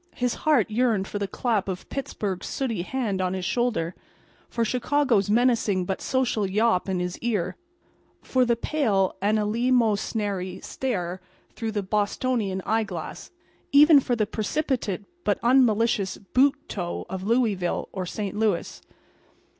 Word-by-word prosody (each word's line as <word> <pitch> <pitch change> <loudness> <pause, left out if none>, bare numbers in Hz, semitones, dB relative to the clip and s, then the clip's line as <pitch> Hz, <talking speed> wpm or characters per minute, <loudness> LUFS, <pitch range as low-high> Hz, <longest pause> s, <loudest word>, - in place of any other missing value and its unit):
His 245 -1 0
heart 275 -9 +2
yearned 220 -4 +1
for 205 - -4
the 200 - -1
clap 215 -2 -1
of 185 -2 -5
Pittsburg's 205 -8 -4
sooty 235 -9 -2
hand 210 -2 -2
on 185 0 0
his 185 -1 -3
shoulder; 225 -9 0 0.6
for 230 -1 0
Chicago's 250 -3 +1
menacing 225 -5 +2
but 190 +1 -3
social 245 -6 0
yawp 210 -1 +2
in 185 -1 0
his 180 0 -3
ear; 215 -7 -1 0.7
for 255 -1 +2
the 240 -1 +2
pale 225 -8 +1
and 210 +2 +2
eleemosynary 210 -4 0
stare 185 -8 -3 0.3
through 225 -2 -4
the 205 -1 -1
Bostonian 205 0 -1
eyeglass—even 280 - +2
for 250 -2 0
the 215 -2 +1
precipitate 220 - -2 0.2
but - - +1
unmalicious 230 -5 +3 0.2
boot 275 +2 +5
toe 175 -3 -4
of 185 +1 -5
Louisville 205 -4 0
or 185 -2 -4
St. 205 +1 -4
Louis. 210 -4 -1
215 Hz, 135 wpm, -25 LUFS, 190-245 Hz, 0.7 s, boot